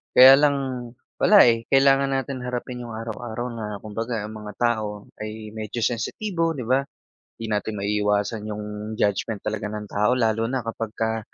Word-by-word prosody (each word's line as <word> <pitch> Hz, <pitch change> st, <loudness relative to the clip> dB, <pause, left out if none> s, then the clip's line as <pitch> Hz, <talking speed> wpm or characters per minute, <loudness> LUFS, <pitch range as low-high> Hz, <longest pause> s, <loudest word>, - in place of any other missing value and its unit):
Kaya 130 Hz, +1 st, +11 dB
lang 145 Hz, -1 st, +4 dB, 0.6 s
wala, 210 Hz, -, +6 dB
eh, 115 Hz, 0 st, +1 dB
kailangan 135 Hz, 0 st, +5 dB
natin 135 Hz, -1 st, -2 dB
harapin 125 Hz, 0 st, -4 dB
yung 120 Hz, -, -8 dB
araw-araw 115 Hz, +1 st, -5 dB
na 115 Hz, -2 st, -5 dB, 0.2 s
kumbaga 115 Hz, +1 st, -3 dB
ang 110 Hz, -, -9 dB
mga 105 Hz, -1 st, -8 dB
tao 110 Hz, -4 st, -1 dB
ay 110 Hz, 0 st, -6 dB
medyo 110 Hz, +2 st, -4 dB
sensitibo, 165 Hz, -, -1 dB
'di 125 Hz, -6 st, -6 dB
ba? 130 Hz, +2 st, +3 dB, 0.6 s
'Di 115 Hz, -, -6 dB
natin 105 Hz, +1 st, -1 dB
maiiwasan 105 Hz, +1 st, 0 dB
yung 105 Hz, 0 st, -5 dB, 0.3 s
judgment 100 Hz, +1 st, 0 dB
talaga 105 Hz, -, -2 dB
ng 105 Hz, 0 st, -5 dB
tao 105 Hz, +3 st, +1 dB
lalo 115 Hz, -2 st, +1 dB
na 130 Hz, -3 st, -2 dB
kapagka 115 Hz, 0 st, -2 dB
115 Hz, 160 wpm, -24 LUFS, 105-125 Hz, 0.6 s, Kaya